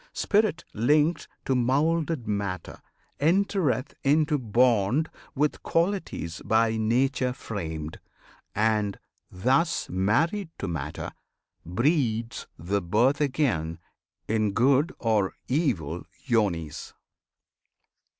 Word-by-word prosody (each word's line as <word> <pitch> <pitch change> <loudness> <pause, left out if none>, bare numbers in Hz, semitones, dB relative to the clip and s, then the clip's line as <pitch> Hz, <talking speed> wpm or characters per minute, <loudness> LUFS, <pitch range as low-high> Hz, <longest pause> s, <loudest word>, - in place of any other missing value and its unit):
Spirit, 210 -4 +1
linked 150 +9 +2 0.2
To 135 - +1
moulded 145 +2 +1
matter, 100 -3 -3 0.4
entereth 165 -4 +1
into 150 +1 +3
bond 120 +4 +2 0.2
With 150 +2 0
qualities 165 - -1
by 110 0 +2
Nature 125 +3 +1
framed, 80 - -5 0.6
and, 105 -2 +1 0.3
thus 135 - +1
Married 150 - +1
to 100 - -4
matter, 75 -3 -4 0.5
breeds 115 - 0
the 100 +5 -1
birth 120 - +2
again 125 - 0 0.5
In 110 -2 +1
good 135 - +3
or 110 -5 +1
evil 100 - -1 0.2
yonis. 95 - -1
120 Hz, 90 wpm, -27 LUFS, 100-150 Hz, 0.6 s, into